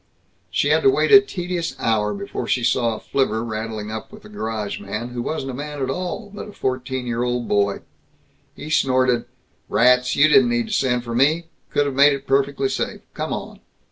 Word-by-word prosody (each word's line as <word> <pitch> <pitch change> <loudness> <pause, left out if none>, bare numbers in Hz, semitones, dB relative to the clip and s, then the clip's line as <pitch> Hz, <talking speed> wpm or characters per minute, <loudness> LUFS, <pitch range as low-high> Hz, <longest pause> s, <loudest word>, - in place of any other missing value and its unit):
She - - +1
had - - +4
to 405 - +5
wait 395 - +2
a 405 -1 +10
tedious 180 - -4
hour 110 -2 +1
before 200 0 -5
she 125 - +1
saw 120 -2 +1
a - - -8
flivver 115 -5 0
rattling 110 -1 -4
up 110 0 -6
with 215 0 -13
the 210 - -13
garage 110 - -4
man, 105 +4 -5
who 120 -1 -4
wasn't 135 0 -3
a - - -8
man 145 +2 -6
at 130 -1 -1
all, 185 +6 -4
but 205 - -7
a - - -12
fourteen 130 -2 -3
year 120 -1 -2
old 125 -1 -1
boy. 100 -1 +1 0.7
He 155 - -8
snorted, 130 -4 +2 0.4
"Rats, 125 +1 +4
you 145 - +6
didn't 205 +9 +5
need 240 -1 +1
to 220 - -6
send 125 - +1
for 120 -1 -5
me. 155 +7 +2 0.2
Could 145 - +1
have 140 - -2
made 140 +2 +6
it 140 0 -5
perfectly 135 0 +1
safe. - - -3
Come - - -4
on." - - -5
130 Hz, 205 wpm, -22 LUFS, 120-160 Hz, 0.7 s, a